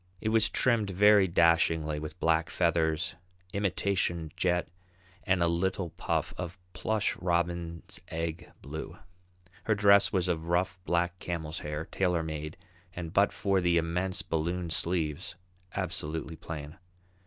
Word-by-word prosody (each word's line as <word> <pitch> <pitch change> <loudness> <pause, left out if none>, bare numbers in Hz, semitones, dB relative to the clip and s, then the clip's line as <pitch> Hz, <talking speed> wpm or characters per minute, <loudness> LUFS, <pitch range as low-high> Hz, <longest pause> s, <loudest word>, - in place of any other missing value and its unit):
It 110 - -1
was 110 -1 +4
trimmed 115 -3 +2
very 100 +1 +6
dashingly 80 -2 +3
with 80 +3 -7
black 80 0 +2
feathers, 85 0 +1 0.4
imitation 95 -4 0
jet, 90 -1 +1 0.6
and 95 -2 +3
a - - +3
little 85 +1 0
puff - - -2
of 90 0 -5 0.2
plush 105 +3 0
robin's 85 -1 -2
egg 80 +1 -4
blue. 80 +3 -6 0.7
Her 110 - +3
dress 100 0 +6
was 95 -2 +1
of 85 -2 -1
rough, 90 +1 +1
black 85 +1 0
camel's 80 -2 -3
hair, 75 +1 -4
tailor 90 -3 0
made, 75 0 -5 0.4
and 85 -2 -5
but 100 +1 +4
for 100 -2 +1
the 85 -1 +3
immense 90 +3 -1
balloon 85 +2 -2
sleeves, 85 0 -1 0.4
absolutely 80 +1 -3
plain. 75 0 -7
85 Hz, 130 wpm, -30 LUFS, 80-95 Hz, 0.7 s, very